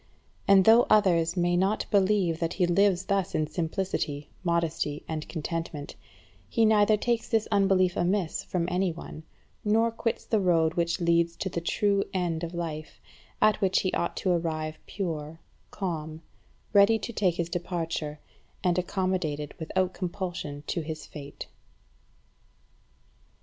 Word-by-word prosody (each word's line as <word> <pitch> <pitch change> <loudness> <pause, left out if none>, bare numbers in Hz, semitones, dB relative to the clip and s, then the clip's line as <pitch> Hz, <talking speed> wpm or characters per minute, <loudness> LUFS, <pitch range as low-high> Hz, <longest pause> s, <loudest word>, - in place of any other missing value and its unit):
And 195 -1 +6
though 230 +2 +7
others 180 -5 +3
may 175 0 +2
not 195 +4 +1
believe 190 -4 +2
that 165 -1 -1
he 180 - +2
lives 185 +1 +3
thus 195 -2 0
in 155 - +2
simplicity, 160 -3 -3
modesty, 165 -4 -1
and 155 -1 -4
contentment, 160 -2 -4 0.5
he 230 -2 +3
neither 215 0 +4
takes 235 +1 -1
this 225 -2 +1
unbelief 195 -3 +3
amiss 180 -1 0
from 175 -2 -2
any 180 0 +1
one, 160 -1 -9 0.4
nor 225 +2 +3
quits 230 0 -2
the 220 - +1
road 165 -4 +3
which 170 0 0
leads 170 -1 +2
to 190 - -3
the 170 - -3
true 200 +3 +1
end 170 -3 -1
of 170 +1 -4
life, 160 -2 -5 0.4
at 215 -1 +4
which 190 -1 +3
he 185 - -1
ought 170 - -1
to 185 - +1
arrive 160 -2 -2
pure, 165 -5 -4 0.3
calm, 160 -4 -4 0.5
ready 205 +2 +6
to 235 +2 -6
take 185 -5 +1
his 170 -1 -1
departure, 165 -4 -3 0.4
and 180 -1 +2
accommodated 180 -6 -2
without 185 +3 -1
compulsion 175 -5 -4
to 170 - -2
his 155 -1 -6
fate. 140 -2 -9
175 Hz, 145 wpm, -28 LUFS, 165-195 Hz, 0.5 s, though